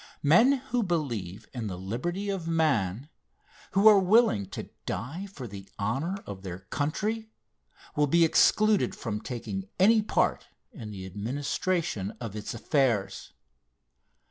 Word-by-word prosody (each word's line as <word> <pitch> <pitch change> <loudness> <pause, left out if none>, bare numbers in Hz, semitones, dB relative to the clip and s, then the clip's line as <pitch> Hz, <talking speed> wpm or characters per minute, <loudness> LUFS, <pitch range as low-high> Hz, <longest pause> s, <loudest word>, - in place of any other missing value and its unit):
Men 225 - +6 0.2
who 245 -1 +2
believe 115 - -3
in 120 -4 -4
the 95 -3 -5
liberty 170 - -3
of 180 -4 -4
man, 140 - +1 0.7
who 195 +3 +5
are 210 -2 +9
willing 185 - +4
to - - -7 0.2
die 140 - -4
for 160 -10 -9
the 100 -3 -9
honor 135 - -1
of 100 -2 -7
their 90 -2 -6
country, 205 - -2 0.7
will 150 0 +3
be 170 +3 +5
excluded 215 +5 +3
from 105 -3 -4
taking 190 - -5
any 215 +4 +6
part 210 - 0 0.2
in 125 - -8
the 95 -3 -7
administration 115 - -2
of 115 -4 -6
its 105 +2 -5
affairs. 115 -5 0
140 Hz, 135 wpm, -28 LUFS, -, 0.7 s, are